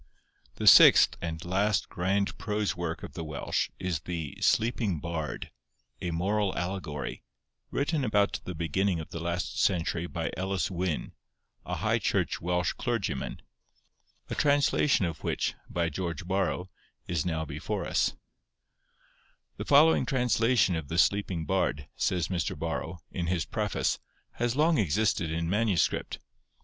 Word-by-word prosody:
The - - -4
sixth - - +8
and 80 -1 -4
last 95 +2 +1
grand 100 +3 0
prose 105 -1 -1
work 85 -2 -4
of - - -8
the 80 - -5
Welsh 75 -2 -2
is 90 -4 -2
the 80 -3 -5
'Sleeping 110 -6 +2
Bard,' 80 -1 -4 0.5
a 90 - -2
moral 95 +4 0
allegory, 90 -5 -4 0.5
written 145 +1 0
about 105 -4 +2
the 90 - -6
beginning 85 +3 0
of 80 - -8
the 85 - -5
last 85 +1 -2
century 85 -2 +1
by 85 -2 -3
Elis 95 +1 -1
Wyn, 90 -3 -2 0.6
a - - -2
High - - +1
Church - - 0
Welsh 90 +1 0
clergyman, 115 - -3 0.8
a - - -4
translation 145 -5 +3
of 80 -2 -5
which, - - -1 0.2
by 85 -1 0
George 85 +3 -4
Borrow, 95 -1 -1 0.4
is 85 -4 0
now 80 -2 -2
before - - -4
us:— - - +1 1.4
'The - - -5
following 145 -2 +5
translation 120 -6 +2
of 80 -3 -4
the 80 - -3
Sleeping 90 -1 +2
Bard,' 70 -1 0
says 90 -3 0
Mr. 90 -4 -2
Borrow, 85 +2 -3
in 85 -2 -3
his 90 -1 0
preface, - - -1 0.3
'has 120 0 -1
long 155 0 +3
existed 95 -2 +1
in 85 +1 -2
manuscript. 105 -1 +1
90 Hz, 140 wpm, -29 LUFS, 85-105 Hz, 1.4 s, sixth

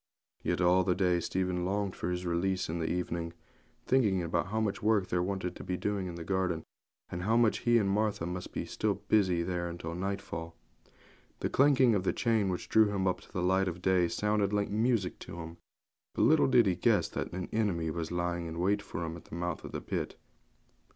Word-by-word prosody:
Yet - - -1
all 90 +1 +5
the 90 0 +1
day 90 -2 +2
Stephen 90 0 -1
longed 100 +1 -1
for 85 - -3
his 90 0 -3
release 90 +2 0
in 85 +1 -2
the 80 - -1
evening, 85 -1 -2 0.5
thinking 105 -8 +3
how 95 +6 0
much 105 -3 -1
work 105 -3 +2
there 90 - +1
wanted 95 -1 -2 0.3
doing 100 -2 -1
in 85 - -6
the 85 - -6
garden, 90 -3 -1 0.5
and 85 - -4
how 110 +5 +2
he 120 0 +2
and 105 -4 +2
Martha 105 -3 0
must 90 +1 -5
be - - -4 0.4
busy 95 -5 +3
in 85 - -3
it 85 -1 -3
till 85 0 -5
nightfall. 90 -3 -4 0.9
The - - -1
clanking 135 -3 +5
of 100 -3 +1
the - - +1
chain 110 -5 +1
which 90 - -3
drew 110 -1 +5
him 95 -2 -1
up 95 -1 0
to - - -18
the 90 - -2
light 95 +1 +2
of 90 0 -3
day 95 -2 +3
sounded 105 +3 0
like 105 -1 0
music 110 -3 +1
to - - -9
him; 85 0 -8 0.6
but - - +2
little 155 0 +5
did 125 -3 +5
he 95 -2 +2
guess 100 -1 +2
that - - -4
an 90 +1 -4
enemy 90 -8 0
was 80 0 -4
lying 85 -1 -1
in 80 0 -6
wait 100 +4 +1
for 85 - -5
him 80 0 -5
at 85 - -12
the - - -9
mouth 85 +1 -3
of - - -7
the - - -4
pit. - - -3
90 Hz, 210 wpm, -31 LUFS, 85-105 Hz, 0.9 s, all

